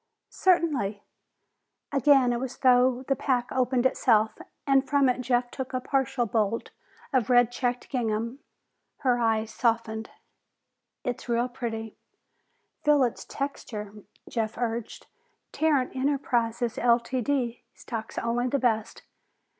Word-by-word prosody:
"Certainly." 290 - +1 0.9
Again 275 -3 +4
it 240 - -1
was 260 0 -4
as - - -28
though 255 0 +4
the 275 - +2
pack 250 -2 0
opened 255 -1 +1
itself, 220 -4 +3 0.3
and 270 -1 +4
from 280 -2 +4
it 250 0 +1
Jeff 245 0 0
took 265 -1 -6
a - - +1
partial 265 -1 0
bolt 220 0 -1 0.4
of 255 -4 +2
red 245 -1 +5
checked 245 0 -2
gingham. 230 0 -2 0.6
Her 250 -4 +2
eyes 225 -1 0
softened. 225 -2 0 0.9
"It's 245 0 -4
real 235 +1 +2
pretty." 225 -3 -5 0.9
"Feel 295 -2 +5
its 240 - -2
texture," 215 -7 -5 0.3
Jeff 225 -2 -2
urged. 230 -1 -3 0.5
"Tarrant 290 -5 +1
Enterprises, 245 -4 0
Ltd., 245 +1 +1 0.2
stocks 225 -2 -7
only 240 +2 0
the 280 - +1
best. 225 -4 -1
245 Hz, 125 wpm, -27 LUFS, 230-265 Hz, 0.9 s, red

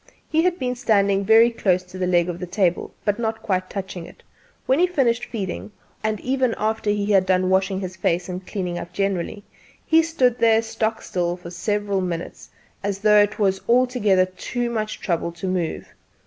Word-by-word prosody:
He 320 - +2
had 355 0 +1
been 250 -4 -1
standing 200 -5 +2
very 225 +3 +6
close 185 -5 +1
to 185 +1 -11
the 180 - 0
leg 175 -1 +3
of 175 -1 -4
the 180 - -5
table, 180 -1 0
but 205 +1 +1
not 225 -1 -2
quite 185 -2 -1
touching 190 -3 -6
it, - - -17 0.4
when 265 +3 +2
he 360 - +5
finished 255 -9 +1
feeding; 205 -1 -5 0.3
and 215 -1 -1
even 260 -2 0
after 215 0 -1
he 205 0 0
had 190 -2 +4
done 185 0 +2
washing 190 0 +1
his 185 -1 -5
face 175 -1 0
and 180 0 -6
cleaning 180 -3 -3
up 170 +1 -8
generally, 195 +1 -2 0.4
he 320 0 +5
stood 260 -7 +1
there 225 -1 +4
stock 225 0 -2
still 175 -1 -2
for 175 -1 -10
several 205 +1 -1
minutes, 175 -2 -5 0.3
as 200 -1 -1
though 210 +1 +5
it 205 0 0
was 190 -2 +1
altogether 235 -7 +3
too 235 +6 -4
much 215 -2 -3
trouble 170 -2 -1
to 170 +2 -7
move. 180 -3 -3
200 Hz, 190 wpm, -22 LUFS, 185-225 Hz, 0.4 s, very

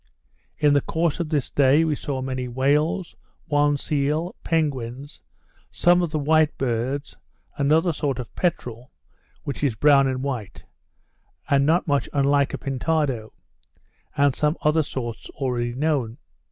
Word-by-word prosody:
In 150 -1 +3
the 145 - +3
course 165 +1 -1
of 170 -3 -2
this 150 -4 -1
day 140 +3 +4
we 160 -2 +1
saw 135 -2 -4
many 130 -1 -3
whales, 145 +8 0 0.3
one 145 0 +2
seal, 150 +4 -1
penguins, 140 -3 -2 0.5
some 175 +1 +3
of 175 - -1
the 155 - -2
white 155 +1 +2
birds, 130 +3 -2 0.4
another 155 +4 +2
sort 145 -3 -2
of 125 -3 -7
peterel, 125 -9 -3 0.5
which 140 0 -5
is 135 -6 +1
brown 140 +2 +5
and 130 0 -2
white, 125 -8 -5 0.9
and 140 0 +4
not 170 +3 +3
much 145 -2 0
unlike 140 0 +2
a - - -4
pintado; 135 -4 -1 0.9
and 140 -2 +3
some 150 +2 0
other 155 +1 +3
sorts 120 -6 -6
already 120 -3 -2
known. 135 -5 -1
140 Hz, 140 wpm, -23 LUFS, 130-155 Hz, 0.9 s, brown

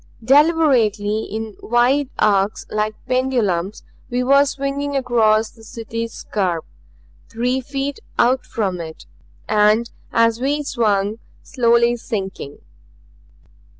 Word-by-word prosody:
Deliberately, 250 -7 +3
in 220 0 -6
wide 250 +4 +2
arcs 200 0 +1
like 215 0 -1
pendulums, 230 -8 0 0.3
we 250 +1 -1
were 280 +2 +5
swinging 280 +1 -3
across 225 -4 +2
the 225 - -18
City's 230 0 -5
scarp; 180 -8 -2 0.6
three 250 +3 -1
feet 275 +1 -4 0.2
out 250 +2 +3
from 190 -5 -3
it, 160 -1 -9 0.4
and 215 +2 +3 0.2
as 230 +1 +2
we 290 +3 0
swung, 215 -5 0 0.2
slowly 235 -1 +2
sinking. 195 - -5
230 Hz, 105 wpm, -20 LUFS, 215-260 Hz, 0.6 s, were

